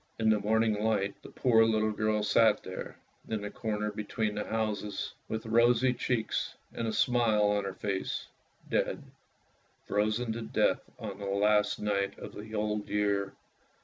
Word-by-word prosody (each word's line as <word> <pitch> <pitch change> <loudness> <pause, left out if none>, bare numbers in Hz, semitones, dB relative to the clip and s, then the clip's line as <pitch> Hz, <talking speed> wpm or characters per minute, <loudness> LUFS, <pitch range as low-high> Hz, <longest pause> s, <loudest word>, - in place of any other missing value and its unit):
In 110 -1 +2
the 110 - +4
cold 100 - -7
morning 110 -1 +2
light 100 -3 0
the - - -11
poor 115 -3 +4
little 110 -1 +2
girl 110 0 0
sat 110 +1 +4
there, 95 - -7 0.3
in 110 -2 -2
the 105 - -4
corner 105 -1 -2
between 105 0 -2
the 105 0 -3
houses, 105 -2 -2
with 110 0 -4
rosy 120 +2 +4
cheeks 120 -2 -1 0.2
and 115 - -2
a - - 0
smile 115 -2 +3
on 105 -1 +2
her 95 -1 -4
face 95 -1 -2 0.2
— - - -31
dead. - - 0 0.8
Frozen 110 +3 0
to 115 - -5
death 110 - +1 0.2
on 100 -3 -6
the 100 - -5
last 105 +1 +2
night 100 -1 -1
of - - -8
the 110 +1 -8
old 105 0 -1
year. 100 -1 0
105 Hz, 170 wpm, -30 LUFS, 105-110 Hz, 0.8 s, the